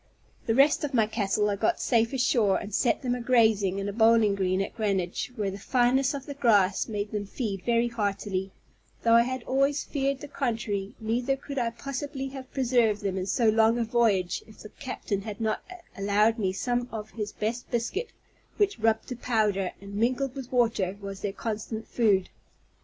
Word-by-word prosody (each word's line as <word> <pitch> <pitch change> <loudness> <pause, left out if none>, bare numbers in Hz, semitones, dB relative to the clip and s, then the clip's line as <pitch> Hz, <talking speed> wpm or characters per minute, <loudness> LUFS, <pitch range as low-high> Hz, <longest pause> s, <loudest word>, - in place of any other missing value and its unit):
The 225 - +2
rest 275 +4 +4
of 285 -3 -2
my 225 -3 +4
cattle 210 -1 0
I - - 0
got 345 - 0
safe 230 -2 +2
ashore, 240 -6 +2
and 205 -1 -7
set 240 +5 +1
them 245 -1 0
a 250 - -3
grazing 220 -6 +3
in 200 0 -2
a 205 - -3
bowling 225 -1 +4
green 190 -1 0
at 195 - -3
Greenwich, 195 -1 -1
where 205 -4 -1
the 195 - -7
fineness 255 +5 +2
of 275 -1 -6
the 285 - -6
grass 205 -8 +3
made 205 -1 -3
them 205 -1 -3
feed 200 -4 -3
very 235 0 +2
heartily, 200 -4 -2 0.5
though 230 - +4
I 230 - +8
had 255 0 -2
always 275 +3 +1
feared 275 -1 -2
the 290 - -7
contrary: 220 -8 -2
neither 245 +5 0
could 275 0 -5
I 235 -1 +1
possibly 270 +2 -5
have 265 -1 -9
preserved 240 -5 +2
them 195 -2 -1
in 190 0 -3
so 230 +2 +2
long 220 +1 +4
a 235 - +1
voyage 220 -6 +1
if 220 - -16
the 215 - -9
captain 220 -7 -4
had 210 0 -7
not 220 -1 -1 0.3
allowed 210 +3 +2
me 190 -3 +1
some 245 +5 -1
of 215 -1 -6
his 210 -2 -4
best 230 +3 -3
biscuit, 315 - -2 0.5
which 405 - +1
rubbed 220 0 +1
to 250 - -3
powder, 210 -6 0
and 200 0 -10
mingled 250 +5 0
with 265 -2 -8
water, 225 -6 +1
was 195 -1 -7
their 205 - -2
constant 220 +1 -5
food. 205 -6 +2
225 Hz, 195 wpm, -27 LUFS, 205-250 Hz, 0.5 s, I